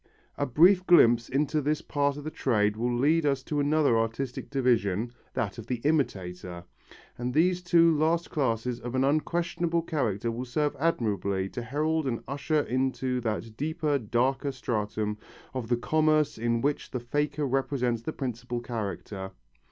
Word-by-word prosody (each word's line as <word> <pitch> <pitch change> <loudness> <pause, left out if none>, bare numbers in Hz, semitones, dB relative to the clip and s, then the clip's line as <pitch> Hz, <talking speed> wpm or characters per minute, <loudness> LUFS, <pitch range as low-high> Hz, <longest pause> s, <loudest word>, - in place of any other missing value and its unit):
A 145 - -1
brief 175 +8 +5
glimpse 120 -9 +6
into 150 +3 +1
this 150 +2 -1
part 145 -1 0
of 145 - -7
the 155 - -5
trade 105 -7 +1
will 120 +3 -1
lead 155 +6 +3
us 140 -3 +1
to 150 - -2
another 145 -3 +3
artistic 115 +3 -3
division, 120 -5 +1 0.2
that 110 +2 -2
of 115 - -9
the 125 - 0
imitator, 90 - -1 0.6
and 125 +1 -2
these 180 +3 +3
two 170 -2 +4
last 165 +3 +1
classes 125 -3 -1
of 120 +1 -5
an 130 - +2
unquestionable 170 +3 0
character 115 - -1
will 120 +3 -4
serve 145 +4 -1
admirably 100 - 0
to 120 - -5
herald 150 +5 -1
and 115 -3 -2
usher 145 +3 0
into 130 -1 -1
that 110 -1 -3
deeper, 155 +1 -1
darker 130 +5 0
stratum 105 -4 -2 0.3
of 130 -3 -4
the 120 0 +1
commerce 155 +2 +2
in 115 0 0
which 145 +2 -1
the 125 - -3
faker 145 +4 -1
represents 130 -3 0
the 135 - -4
principal 125 -3 -4
character. 100 -4 -5
130 Hz, 160 wpm, -28 LUFS, 115-150 Hz, 0.6 s, glimpse